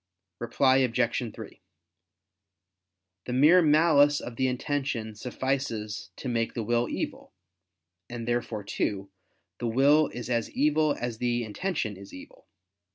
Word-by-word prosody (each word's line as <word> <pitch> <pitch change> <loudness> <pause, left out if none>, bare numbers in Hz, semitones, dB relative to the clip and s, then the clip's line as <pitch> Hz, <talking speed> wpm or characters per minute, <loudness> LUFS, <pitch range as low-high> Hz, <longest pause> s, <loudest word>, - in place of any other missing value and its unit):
Reply 130 +3 +2
Obj. 120 -2 0
3: 110 -2 -11 1.6
The 125 - -4
mere 155 +8 +6
malice 150 -2 +4
of 120 - -8
the 130 +2 +1
intention 130 -4 -2
suffices 115 -3 -3
to - - -7
make 115 -2 -1
the 115 - -2
will 120 +2 0
evil: - - -5 0.8
and 120 -1 -6
therefore 120 -3 -2
too, 100 0 -3 0.5
the 120 - -2
will 140 +6 +4
is 120 -1 -7
as 120 -3 -1
evil 150 +1 +2
as 120 -2 -4
the 120 -1 0
intention 110 - -3
is 100 0 -12
evil. 90 - -14
120 Hz, 130 wpm, -27 LUFS, 115-140 Hz, 1.6 s, mere